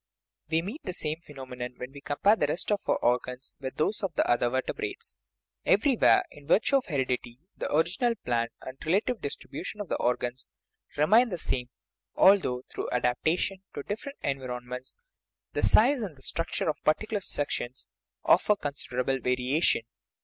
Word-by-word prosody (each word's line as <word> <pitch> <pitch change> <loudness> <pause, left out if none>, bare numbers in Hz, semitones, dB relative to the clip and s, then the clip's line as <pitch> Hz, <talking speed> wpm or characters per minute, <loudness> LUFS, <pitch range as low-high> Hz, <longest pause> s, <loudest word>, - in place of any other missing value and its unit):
We 160 0 +2
meet 215 - -6
the 185 - -3
same 155 0 -3
phenomenon 130 -5 -7
when 125 +1 -6
we 140 0 -11
compare 170 +10 +3
the 150 - +1
rest 165 +7 -1
of 205 - +2
our - - +3
organs 125 +2 0
with 130 -1 -5
those 180 +7 0
of 190 -6 -2
the - - +2
other 120 0 +3
verte 130 +1 -1
brates; 425 +2 -5 0.5
everywhere, 270 -6 +4
in 145 -1 -15
virtue 220 - +4
of 265 - -3
heredity, 125 -5 -1 0.2
the - - -4
original 185 - +2
plan 115 -1 +1
and 130 +1 -9
the - - -10
relative 210 +7 +1
distribution 170 +7 -5
of 205 - -5
the - - 0
organs 125 +1 -1 0.5
remain 220 +12 +5
the 180 - -3
same, 125 -6 -2 0.5
although, 180 -11 +5
through - - -3
adaptation 155 +10 0
to 145 - -4
different 275 - -5
environments, 125 -1 -4 0.6
the - - 0
size 255 +4 +5
and 190 -8 -4
the 130 - -13
structure 165 +3 -2
of 155 - -1
particular 205 +7 +1
sections 130 -7 -3 0.4
offer 210 - +5
considerable 135 -5 -2
variation. 125 +3 +2
145 Hz, 165 wpm, -28 LUFS, 125-200 Hz, 0.6 s, remain